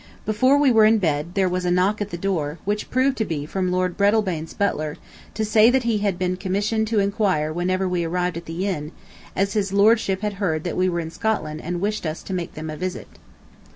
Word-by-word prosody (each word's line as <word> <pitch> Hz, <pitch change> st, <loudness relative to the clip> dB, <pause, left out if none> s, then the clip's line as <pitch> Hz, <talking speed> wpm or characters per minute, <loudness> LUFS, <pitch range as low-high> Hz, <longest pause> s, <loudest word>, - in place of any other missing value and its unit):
Before 255 Hz, +6 st, +3 dB
we 285 Hz, -2 st, +4 dB
were 220 Hz, -2 st, +6 dB
in 220 Hz, +1 st, +5 dB
bed, 160 Hz, -3 st, -1 dB
there 195 Hz, -2 st, +3 dB
was 180 Hz, 0 st, -1 dB
a 180 Hz, -, 0 dB
knock 185 Hz, +4 st, +2 dB
at 205 Hz, -, -2 dB
the 175 Hz, -, -5 dB
door, 170 Hz, -5 st, -2 dB
which 210 Hz, +1 st, -2 dB
proved 260 Hz, +1 st, +1 dB
to -, -, +2 dB
be 150 Hz, -7 st, -3 dB
from 185 Hz, +3 st, -2 dB
Lord 185 Hz, -1 st, 0 dB
Breadalbane's 200 Hz, -6 st, +1 dB
butler, 155 Hz, -7 st, -1 dB, 0.4 s
to 220 Hz, -, -1 dB
say 215 Hz, +1 st, +5 dB
that 260 Hz, 0 st, +2 dB
he 230 Hz, -3 st, +1 dB
had 200 Hz, -3 st, 0 dB
been 185 Hz, 0 st, -1 dB
commissioned 205 Hz, +4 st, -1 dB
to 225 Hz, 0 st, -1 dB
enquire 195 Hz, -7 st, +1 dB
whenever 185 Hz, +2 st, 0 dB
we 180 Hz, -1 st, 0 dB
arrived 180 Hz, +1 st, -1 dB
at 170 Hz, 0 st, -6 dB
the 165 Hz, +4 st, -3 dB
inn, 155 Hz, -5 st, -3 dB, 0.4 s
as 195 Hz, +1 st, 0 dB
his 200 Hz, -3 st, 0 dB
Lordship 200 Hz, -1 st, +3 dB
had 210 Hz, -1 st, -2 dB
heard 160 Hz, -5 st, 0 dB
that 175 Hz, -, -3 dB
we 185 Hz, 0 st, +2 dB
were 170 Hz, -1 st, -1 dB
in 160 Hz, 0 st, -6 dB
Scotland 165 Hz, -8 st, -2 dB
and 175 Hz, +1 st, -4 dB
wished 210 Hz, -3 st, -1 dB
us 155 Hz, +1 st, -5 dB
to 190 Hz, -, -6 dB
make 180 Hz, -2 st, -4 dB
them 155 Hz, 0 st, -5 dB
a 155 Hz, -, -7 dB
visit. 185 Hz, +2 st, -4 dB
185 Hz, 230 wpm, -23 LUFS, 170-210 Hz, 0.4 s, were